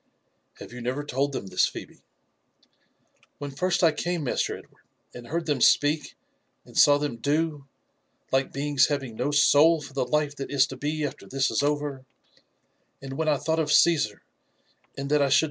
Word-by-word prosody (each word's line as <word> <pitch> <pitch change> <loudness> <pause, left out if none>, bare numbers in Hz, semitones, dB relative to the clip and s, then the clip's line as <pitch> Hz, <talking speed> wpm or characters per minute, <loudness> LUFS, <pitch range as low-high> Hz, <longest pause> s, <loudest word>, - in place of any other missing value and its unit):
" - - -47
Have - - -11
you 125 - -8
never 130 +5 -3
told 140 0 -1
them 135 - -5
this, 90 -1 +1
Phebe?" - - -10 0.7
" - - -38
When 145 0 -6
first 180 +5 -1
I 165 - +6
came. 175 +1 -3
Master 130 - -1
Edward, - - -19 0.3
and 120 -1 -10
heard 165 +4 -3
them 145 -5 -1
speak, 145 +3 +3 0.5
and - - -17
saw 145 0 +6
them 145 -5 -3
do, 145 +2 -1 0.6
like 135 0 +1
beings 140 -1 +2
having 135 -6 -3
no 125 +5 -1
souls 145 +2 +4
for 145 - -13
the 135 - 0
life 145 +3 -1
that 135 - -6
i» 140 - -3
to 135 - +2
be 150 +1 -2
after 140 - -7
this 135 0 0
is - - +1
over, 145 -2 -2 1.0
and 135 -1 -8
when 160 +3 -2
I 150 - +2
thought 160 +4 -1
of 150 -2 0
Caesar, 150 -13 +3 0.7
and 140 0 -4
that 150 -1 +3
I 140 - +2
should - - +3
neve? - - +6
145 Hz, 195 wpm, -26 LUFS, 135-150 Hz, 1.0 s, I